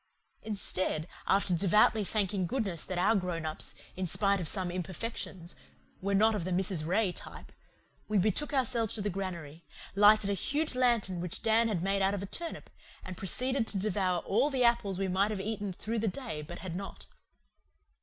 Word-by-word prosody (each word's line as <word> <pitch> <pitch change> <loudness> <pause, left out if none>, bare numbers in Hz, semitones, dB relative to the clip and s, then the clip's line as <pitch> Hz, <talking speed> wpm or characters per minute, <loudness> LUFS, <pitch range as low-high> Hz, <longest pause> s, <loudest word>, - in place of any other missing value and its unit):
Instead, 185 -6 -2 0.2
after 195 -1 +3
devoutly 210 +4 +4
thanking 195 -2 0
goodness 205 -9 -1
that 185 - -4
our 190 +5 +3
grown 180 -4 -2
ups, 155 0 -2 0.2
in 185 0 -2
spite 200 +3 +2
of 175 - -3
some 185 +1 0
imperfections, 180 0 -5 0.5
were 200 +1 0
not 220 +3 +5
of 205 -5 -2
the 185 - -3
Mrs. 180 -3 +2
Ray 195 +2 +2
type, - - -10 0.6
we 215 - +1
betook 215 +9 +2
ourselves 250 -5 +1
to 215 - 0
the 205 - -1
granary, 170 -4 -5 0.3
lighted 205 0 +5
a - - +2
huge 295 - 0
lantern 235 -8 +2
which 180 -1 -6
Dan 225 +1 +4
had 190 -6 -1
made 195 +1 +1
out 195 +1 +2
of 195 - -4
a - - -3
turnip, 335 - -5 0.3
and 185 - -6
proceeded 250 +7 0
to 200 - -2
devour 185 -3 0
all 240 +9 +2
the 265 -3 +1
apples 210 -5 +2
we 195 0 -1
might 190 +3 +2
have 210 -2 -3
eaten 205 0 -3
through 220 +5 -3
the 220 - 0
day 215 - -4
but 175 +4 -8
had 185 -3 -6
not. 195 +2 -7
195 Hz, 185 wpm, -31 LUFS, 180-220 Hz, 0.6 s, not